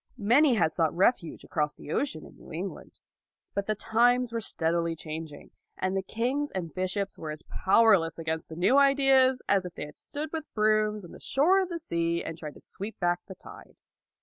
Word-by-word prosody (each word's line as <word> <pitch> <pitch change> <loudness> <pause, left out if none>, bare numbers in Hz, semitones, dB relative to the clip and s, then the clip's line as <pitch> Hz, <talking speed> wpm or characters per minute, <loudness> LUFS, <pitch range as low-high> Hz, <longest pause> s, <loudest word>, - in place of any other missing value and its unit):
Many 250 +5 +4
had 160 -6 +2
sought 160 -2 0
refuge 185 -2 +1
across 150 -2 -2
the 150 - -9
ocean 165 - -2
in - - -15
New - - -15
England. 180 +5 -7 0.5
But 200 0 -2
the 215 - +1
times 240 +3 +2
were 230 - -1
steadily 165 -3 0
changing, 155 -1 -8 0.3
and 185 +1 -1
kings 265 +6 -1
and 170 -5 -5
bishops 185 +2 -2
were 160 - -6
as 150 0 -6
powerless 190 -5 +3
against 160 -1 -4
the 160 - -8
new 195 +11 +4
ideas 270 -2 +4
as 195 -2 +3
if 180 -1 -8
they - - -5
had 150 - -13
stood 300 +1 -6
with 315 -2 -5
brooms 215 -1 +2
on 170 - -12
the - - -12
shore 355 +8 +3
of 370 - -3
the 340 - -3
sea 170 - -1
and - - -5
tried 155 -3 -8
to - - -14
sweep 205 +3 -7
back 175 -1 +1
the 190 - -9
tide. - - -14
195 Hz, 200 wpm, -28 LUFS, 165-250 Hz, 0.5 s, Many